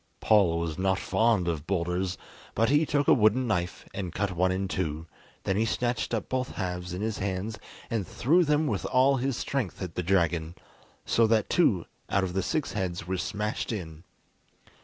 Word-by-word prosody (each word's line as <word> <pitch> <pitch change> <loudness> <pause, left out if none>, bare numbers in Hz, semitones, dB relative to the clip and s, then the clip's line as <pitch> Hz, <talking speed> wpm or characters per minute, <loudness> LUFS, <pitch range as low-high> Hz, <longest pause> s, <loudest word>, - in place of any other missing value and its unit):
Paul 100 -6 +4
was 85 0 -3
not 95 0 +2
fond 110 -3 +2
of 80 -3 -2
boulders, 90 0 -1 0.4
but 115 0 +3
he 150 +2 +3
took 145 -1 +1
a - - +7
wooden 110 +2 +3
knife 90 -6 -2
and 95 -3 -4
cut 100 +3 -1
one 90 +1 +1
in 95 +1 -1
two, 80 -4 -3 0.4
then 95 - 0
he 110 - +3
snatched 120 +4 -1
up 115 -3 -2
both 130 -1 -2
halves 90 -1 -4
in 90 +3 -4
his 110 -1 -2
hands 100 +2 -3 0.3
and 110 -6 -2
threw 170 +8 +3
them 150 0 +2
with - - -1
all 135 +2 +4
his 130 0 -1
strength 130 -9 -2
at 90 -4 -5
the 90 - -2
dragon, 85 -2 +1 0.5
so 115 -1 +3
that 110 -2 +2
two 105 - +3 0.2
out 100 - +2
of 90 -2 -2
the 95 - +1
six 155 +7 -1
heads 90 -4 -3
were 95 +2 -2
smashed 105 +5 -2
in. 80 -7 -6
95 Hz, 190 wpm, -28 LUFS, 90-115 Hz, 0.5 s, a